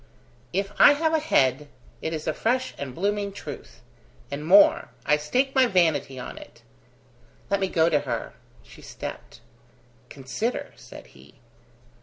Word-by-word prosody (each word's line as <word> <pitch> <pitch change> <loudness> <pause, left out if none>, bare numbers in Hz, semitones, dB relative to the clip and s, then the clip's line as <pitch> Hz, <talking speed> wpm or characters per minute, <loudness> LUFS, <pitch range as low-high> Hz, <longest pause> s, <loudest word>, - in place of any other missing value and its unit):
"If 195 +2 -2
I - - +9
have 320 +2 0
a 320 - +3
head, 145 - +1 0.3
it 160 - -3
is 155 -1 -5
a 155 - 0
fresh 255 +7 -1
and 135 -3 -6
blooming 200 +2 -1
truth. 200 - -10 0.5
And 140 +1 -4
more 190 +6 +5 0.2
I 150 - +4
stake 255 - 0
my 260 -2 +4
vanity 160 - +1
on 125 - -7
it!" - - -15 0.9
"Let 200 - +2
me 190 - 0
go 165 -3 +2
to 155 -3 +3
her." - - -4 0.3
She - - -16
stepped. - - -9 0.7
"Consider," 140 - -4
said - - -13
he. - - -18
180 Hz, 150 wpm, -25 LUFS, 150-230 Hz, 0.9 s, I